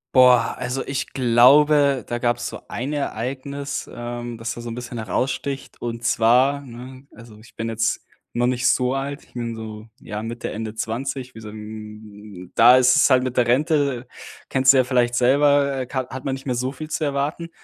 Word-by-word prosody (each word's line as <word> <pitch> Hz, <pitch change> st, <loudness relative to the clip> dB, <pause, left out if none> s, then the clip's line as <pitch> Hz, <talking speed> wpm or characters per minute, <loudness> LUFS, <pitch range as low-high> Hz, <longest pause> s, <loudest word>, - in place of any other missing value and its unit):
Boah, 125 Hz, -2 st, +5 dB
also, 125 Hz, +2 st, -3 dB
ich 135 Hz, -1 st, -4 dB
glaube, 135 Hz, +3 st, +5 dB
da 120 Hz, -, -3 dB
gab's 120 Hz, 0 st, 0 dB
so -, -, -9 dB
ein 130 Hz, +5 st, -4 dB
Ereignis, 140 Hz, +1 st, -4 dB
ähm, 120 Hz, 0 st, -6 dB
das 115 Hz, +1 st, -4 dB
da -, -, -9 dB
so 120 Hz, -, -7 dB
'n 115 Hz, -, -5 dB
bisschen 125 Hz, 0 st, -7 dB
heraussticht, 130 Hz, +5 st, -3 dB
und 115 Hz, 0 st, -5 dB
zwar, 125 Hz, +5 st, +3 dB
ne, 130 Hz, +2 st, -11 dB
also, 110 Hz, -1 st, -14 dB
ich 110 Hz, -, -18 dB
bin 115 Hz, 0 st, -3 dB
jetzt 115 Hz, 0 st, -1 dB, 0.3 s
noch 120 Hz, +1 st, +1 dB
nicht 125 Hz, 0 st, +1 dB
so 125 Hz, 0 st, +2 dB
alt, 140 Hz, +1 st, -4 dB
ich -, -, -25 dB
bin 115 Hz, -1 st, -4 dB
so, 110 Hz, 0 st, -8 dB
ja, 105 Hz, -1 st, -6 dB
Mitte 115 Hz, +1 st, -5 dB
Ende 110 Hz, 0 st, -5 dB
20, 130 Hz, +3 st, -4 dB
wie -, -, -11 dB
so 110 Hz, -, -10 dB
'n 105 Hz, -3 st, -10 dB
da 120 Hz, +2 st, +8 dB
ist 130 Hz, +1 st, +5 dB
es 145 Hz, -, +5 dB
halt 130 Hz, -1 st, +4 dB
mit 130 Hz, -1 st, -4 dB
der 120 Hz, -, +3 dB
Rente, 140 Hz, -1 st, +1 dB, 0.4 s
kennst 130 Hz, 0 st, +5 dB
du -, -, +3 dB
ja 130 Hz, -, +5 dB
vielleicht 120 Hz, -1 st, +1 dB
selber, 140 Hz, +1 st, +3 dB
ka 130 Hz, 0 st, -4 dB
hat 130 Hz, 0 st, -8 dB
man 135 Hz, -, -1 dB
nicht 135 Hz, -, -11 dB
mehr 125 Hz, -3 st, -1 dB
so 130 Hz, +2 st, -2 dB
viel 155 Hz, +3 st, -8 dB
zu 155 Hz, 0 st, -1 dB
erwarten. 145 Hz, +4 st, -2 dB
Und -, -, -12 dB
125 Hz, 200 wpm, -22 LUFS, 115-135 Hz, 0.4 s, da